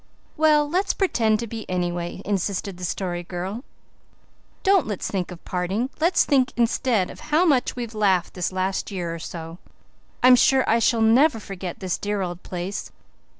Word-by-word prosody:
"Well, 305 Hz, -1 st, +4 dB
let's 365 Hz, +6 st, 0 dB
pretend 225 Hz, -, +2 dB
to -, -, -3 dB
be, 225 Hz, 0 st, -6 dB
anyway," 175 Hz, 0 st, -3 dB
insisted 195 Hz, -1 st, -2 dB
the 180 Hz, -, -9 dB
Story 175 Hz, 0 st, -3 dB
Girl. 185 Hz, +6 st, -5 dB, 1.0 s
"Don't 390 Hz, -2 st, +4 dB
let's 205 Hz, -4 st, -3 dB
think 185 Hz, -3 st, -2 dB
of 180 Hz, -2 st, -11 dB
parting. 190 Hz, +8 st, -2 dB
Let's 340 Hz, +3 st, +3 dB
think 265 Hz, -3 st, +2 dB
instead 235 Hz, -4 st, +1 dB
of -, -, -12 dB
how 315 Hz, +4 st, +4 dB
much 275 Hz, -7 st, +2 dB
we've 235 Hz, -2 st, -5 dB
laughed 195 Hz, -5 st, +1 dB
this 180 Hz, -1 st, -2 dB
last 185 Hz, +1 st, -2 dB
year 175 Hz, -4 st, -3 dB
or 170 Hz, -, -6 dB
so. 165 Hz, +1 st, -8 dB, 0.6 s
I'm 255 Hz, 0 st, +9 dB
sure 265 Hz, +1 st, +4 dB
I 230 Hz, -, +3 dB
shall 230 Hz, 0 st, +2 dB
never 240 Hz, +4 st, +4 dB
forget 190 Hz, -4 st, -7 dB
this 185 Hz, -2 st, -2 dB
dear 205 Hz, -1 st, -2 dB
old 175 Hz, 0 st, -5 dB
place. 180 Hz, +2 st, -5 dB
205 Hz, 170 wpm, -23 LUFS, 180-250 Hz, 1.0 s, I'm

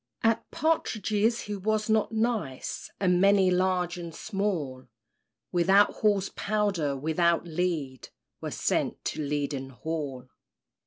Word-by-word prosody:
At 225 Hz, 0 st, +2 dB
partridges 225 Hz, -, +1 dB
he 210 Hz, -, -4 dB
was 215 Hz, +2 st, 0 dB
not 220 Hz, -1 st, +2 dB
nice; 220 Hz, -, -2 dB
And 180 Hz, -2 st, +3 dB
many, 195 Hz, -1 st, +5 dB
large 180 Hz, -1 st, +1 dB
and 170 Hz, -2 st, -7 dB
small, 175 Hz, -, -3 dB, 0.6 s
Without 190 Hz, +4 st, +4 dB
Hall's 205 Hz, -3 st, +2 dB
powder, 195 Hz, -9 st, 0 dB
without 165 Hz, +4 st, +1 dB
lead, 160 Hz, -6 st, -2 dB, 0.3 s
Were -, -, -3 dB
sent -, -, -1 dB
to -, -, -2 dB
Leaden 140 Hz, -2 st, -2 dB
Hall. 135 Hz, -2 st, -5 dB
180 Hz, 115 wpm, -28 LUFS, 155-210 Hz, 0.6 s, many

